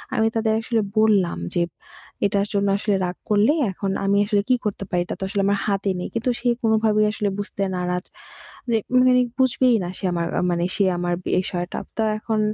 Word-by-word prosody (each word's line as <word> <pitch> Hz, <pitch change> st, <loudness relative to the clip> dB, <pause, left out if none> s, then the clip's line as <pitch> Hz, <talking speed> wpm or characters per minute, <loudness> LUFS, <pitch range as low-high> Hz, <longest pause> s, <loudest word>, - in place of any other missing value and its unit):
আমি 220 Hz, -2 st, +3 dB
তাদের 220 Hz, -1 st, +1 dB
আসলে 225 Hz, 0 st, 0 dB, 0.2 s
বললাম 210 Hz, -5 st, +3 dB, 0.2 s
যে, 175 Hz, -, +1 dB, 0.6 s
এটার 200 Hz, 0 st, +1 dB
জন্য 200 Hz, 0 st, +1 dB
আসলে 205 Hz, 0 st, 0 dB
রাগ 180 Hz, 0 st, -4 dB
করলে, 210 Hz, +6 st, +4 dB, 0.2 s
এখন 195 Hz, +1 st, -3 dB
আমি 200 Hz, +1 st, +3 dB
আসলে 205 Hz, -1 st, +2 dB
কী 255 Hz, -, +5 dB
করতে 205 Hz, -1 st, -2 dB
পারি? 175 Hz, -, +1 dB
এটা -, -, -5 dB
তো -, -, -4 dB
আসলে 200 Hz, 0 st, 0 dB
আমার 200 Hz, 0 st, +2 dB
হাতে 200 Hz, -1 st, 0 dB
নেই। 180 Hz, -, -3 dB
কিন্তু 230 Hz, +2 st, -1 dB
সে 245 Hz, -, -3 dB, 0.2 s
কোনভাবেই 220 Hz, -1 st, +3 dB
আসলে 210 Hz, -1 st, -1 dB
বুঝতে 200 Hz, -1 st, -3 dB
নারাজ 180 Hz, 0 st, -2 dB, 0.7 s
যে, 225 Hz, -, +4 dB, 0.3 s
মানে -, -, +6 dB, 0.3 s
বুঝবেই 255 Hz, -1 st, +3 dB
না 175 Hz, -, -4 dB
সে -, -, -12 dB
আমার 170 Hz, -1 st, -1 dB, 0.3 s
মানে 170 Hz, 0 st, 0 dB
সে 200 Hz, -, +2 dB
আমার 175 Hz, 0 st, -1 dB, 0.2 s
বিষয়টা। 180 Hz, -1 st, -2 dB, 0.2 s
তো 225 Hz, -, +2 dB
এখন 215 Hz, 0 st, -2 dB
205 Hz, 190 wpm, -22 LUFS, 185-220 Hz, 0.7 s, মানে